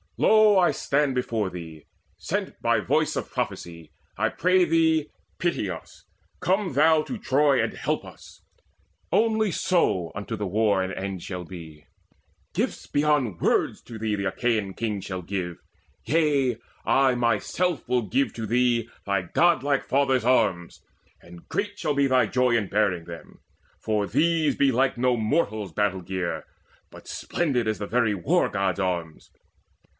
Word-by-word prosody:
Lo, 215 Hz, -2 st, +5 dB
I 180 Hz, -2 st, +5 dB
stand 140 Hz, -1 st, 0 dB
Before 115 Hz, -5 st, -1 dB
thee, 80 Hz, -4 st, -9 dB, 0.3 s
sent -, -, -4 dB
by -, -, +2 dB
voice -, -, +1 dB
of -, -, -4 dB
prophecy. 85 Hz, -3 st, -5 dB, 0.3 s
I -, -, +1 dB
pray 185 Hz, 0 st, +3 dB
thee, 160 Hz, -2 st, +2 dB, 0.3 s
pity 170 Hz, -, 0 dB
us: 85 Hz, -3 st, -9 dB, 0.3 s
come 190 Hz, -2 st, 0 dB
thou 155 Hz, +3 st, +4 dB
to 250 Hz, -, -5 dB
Troy 140 Hz, -6 st, +2 dB
And -, -, -2 dB
help -, -, -2 dB
us. -, -, -14 dB, 0.7 s
Only 220 Hz, -2 st, +2 dB
so 95 Hz, -, +1 dB
unto 100 Hz, +3 st, -5 dB
the 105 Hz, -1 st, -4 dB
war 100 Hz, 0 st, +2 dB
An 95 Hz, -, -4 dB
end 95 Hz, -2 st, -5 dB
shall 90 Hz, -2 st, -5 dB
be. 80 Hz, -4 st, -11 dB, 0.7 s
Gifts -, -, -2 dB
beyond 145 Hz, -, 0 dB
words -, -, +1 dB
to 115 Hz, -, -9 dB
thee 110 Hz, -1 st, -1 dB
The 100 Hz, 0 st, -3 dB
Achaean 105 Hz, -1 st, -1 dB
kings 105 Hz, -2 st, -3 dB
shall 95 Hz, -2 st, -5 dB
give: 90 Hz, -2 st, -4 dB, 0.5 s
yea, 145 Hz, -6 st, +2 dB, 0.3 s
I 135 Hz, -1 st, +3 dB
myself 120 Hz, -, 0 dB
Will 125 Hz, -1 st, +1 dB
give 135 Hz, +5 st, 0 dB
to 115 Hz, -, -5 dB
thee 120 Hz, 0 st, +1 dB, 0.2 s
thy 100 Hz, -2 st, 0 dB
godlike 140 Hz, -, +2 dB
father's 135 Hz, -3 st, +1 dB
arms, 95 Hz, -9 st, +1 dB, 0.4 s
And 85 Hz, 0 st, -14 dB
great 205 Hz, 0 st, -3 dB
shall 150 Hz, -, 0 dB
be 140 Hz, 0 st, +3 dB
thy 130 Hz, -1 st, +3 dB
joy 125 Hz, -2 st, +2 dB
in 110 Hz, -4 st, 0 dB
bearing 95 Hz, -5 st, +1 dB
them; 85 Hz, -1 st, -11 dB, 0.4 s
For 105 Hz, -2 st, 0 dB
these 155 Hz, +5 st, +1 dB
be 140 Hz, -1 st, +3 dB
like 130 Hz, +1 st, +1 dB
no 125 Hz, 0 st, +3 dB
mortal's 110 Hz, -, -1 dB
battle 100 Hz, -1 st, 0 dB
gear, 90 Hz, 0 st, -4 dB, 0.5 s
But -, -, -14 dB
splendid 135 Hz, -9 st, -1 dB
as 110 Hz, -, -1 dB
the 105 Hz, -, -4 dB
very 115 Hz, -2 st, +1 dB
War 90 Hz, -, +1 dB
god's 95 Hz, -2 st, -1 dB
arms. 85 Hz, -4 st, -3 dB
115 Hz, 155 wpm, -25 LUFS, 95-145 Hz, 0.7 s, Lo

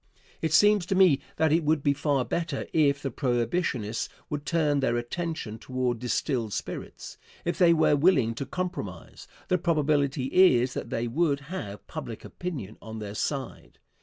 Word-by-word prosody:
It 160 Hz, -, 0 dB
seems 205 Hz, +2 st, +5 dB
to 190 Hz, -, 0 dB
me 185 Hz, -7 st, +5 dB, 0.2 s
that 160 Hz, -1 st, +2 dB
it 165 Hz, +1 st, +3 dB
would 150 Hz, -1 st, +1 dB
be 140 Hz, -, +3 dB
far 140 Hz, -2 st, 0 dB
better 165 Hz, -5 st, -2 dB
if 145 Hz, -2 st, +3 dB
the 135 Hz, -, -2 dB
Prohibitionists 120 Hz, -, -1 dB, 0.2 s
would 145 Hz, 0 st, -4 dB
turn 150 Hz, -4 st, +2 dB
their 125 Hz, -3 st, +1 dB
attention 120 Hz, -3 st, -4 dB
toward 125 Hz, -2 st, -2 dB
distilled 125 Hz, -2 st, -1 dB
spirits. -, -, -6 dB, 0.3 s
If 175 Hz, -, -1 dB
they 175 Hz, -2 st, +6 dB
were 160 Hz, -2 st, +4 dB
willing 140 Hz, -7 st, +3 dB
to 130 Hz, +3 st, -5 dB
compromise, 175 Hz, -, -5 dB, 0.2 s
the 180 Hz, -, +2 dB
probability 150 Hz, -5 st, +1 dB
is 130 Hz, -9 st, +5 dB
that -, -, -5 dB
they 120 Hz, +1 st, -1 dB
would 140 Hz, +2 st, +1 dB
have 105 Hz, -, -6 dB
public -, -, -7 dB
opinion 130 Hz, -, -6 dB
on 110 Hz, 0 st, -8 dB
their 105 Hz, -2 st, -6 dB
side. 130 Hz, +3 st, -4 dB
140 Hz, 165 wpm, -27 LUFS, 120-165 Hz, 0.3 s, they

